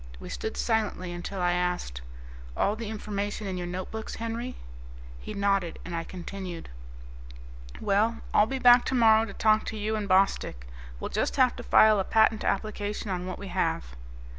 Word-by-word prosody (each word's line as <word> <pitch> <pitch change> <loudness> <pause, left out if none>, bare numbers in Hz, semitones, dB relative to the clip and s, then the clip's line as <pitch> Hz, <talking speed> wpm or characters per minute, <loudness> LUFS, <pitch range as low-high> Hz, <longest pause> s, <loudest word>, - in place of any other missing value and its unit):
We - - -9
stood 220 - -4
silently 210 -6 -1
until 175 +3 -5
I 175 0 +2
asked, 180 - -2 0.6
"All 205 - +2
the 225 -1 -5
information 205 -1 -4
in 190 -1 -3
your 175 -1 -4
notebooks, 185 +5 -5
Henry?" 230 +2 -4 0.6
He - - -7
nodded, 195 -3 +1
and 175 - -5
I 165 - -2
continued, 185 -1 -7 1.1
"Well, 215 +3 +1
I'll 210 - +5
be 270 - -2
back 245 -1 +7
tomorrow 225 -3 +4
to 200 - -8
talk 215 +1 +3
to 220 - -4
you 215 +1 -1
and 210 -2 -3
Bostick. 185 - +2 0.3
We'll - - -4
just - - 0
have - - +4
to - - -5
file 215 - +5
a - - +1
patent 220 +1 +3
application 210 0 -2
on 180 0 -3
what 185 - -5
we 200 - -8
have." - - -1
200 Hz, 170 wpm, -28 LUFS, 180-220 Hz, 1.1 s, back